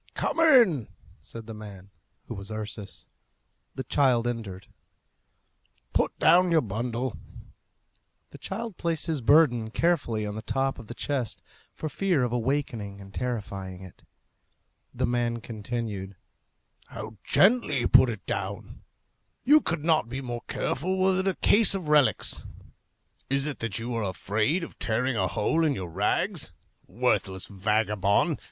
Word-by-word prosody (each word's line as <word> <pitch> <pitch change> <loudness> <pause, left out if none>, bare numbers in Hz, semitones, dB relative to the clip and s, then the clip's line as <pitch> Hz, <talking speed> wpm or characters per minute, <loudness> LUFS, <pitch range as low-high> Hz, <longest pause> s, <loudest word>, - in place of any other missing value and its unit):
"Come - - -1
in!" 235 - +5 0.3
said 115 -1 -10
the 115 - -8
man, 100 -3 -11 0.3
who - - -6
was 100 +1 -8
Ursus. 105 -4 -7 0.7
The 130 - -4
child 125 -3 +2
entered. 100 -6 -5 1.3
"Put - - 0
down 180 +1 +5
your 165 -2 +4
bundle." 115 +3 -3 1.2
The - - -12
child 220 0 -5
placed 165 -2 -1
his 160 -5 -2
burden 120 -4 +4
carefully 120 -7 0
on 105 - -4
the 110 - -5
top 135 +4 -1
of 115 - -11
the 120 - -8
chest, 130 -5 -2 0.3
for 155 - -4
fear 175 -2 +1
of 120 - -1
awakening 120 -5 -2
and 95 0 -12
terrifying 100 -6 -4
it. 95 - -14 0.9
The - - -1
man 120 -1 0
continued, 105 -3 -5 0.7
"How 110 0 -8
gently 195 - +3
you - - +1
put 130 - +6
it 110 -4 -6
down! - - -5 0.6
You 300 +3 +6
could 165 -2 -2
not 160 -8 +2
be 130 +2 -4
more 120 -3 -5
careful 185 +8 -1
were 190 0 +3
it 190 - 0
a 190 - +1
case 205 -2 +4
of 180 -6 -4
relics. 150 -3 +3 0.9
Is 135 +1 +2
it 150 -2 -3
that 115 -3 -2
you 120 +2 -3
are 115 -1 -1
afraid 105 - 0
of - - -9
tearing 125 +3 0
a 95 -4 +1
hole 160 - +1
in 150 -3 +2
your 90 -6 -6
rags? 105 - 0 0.4
Worthless 95 -1 0
vagabond! 105 0 +1
120 Hz, 145 wpm, -27 LUFS, 105-155 Hz, 1.3 s, put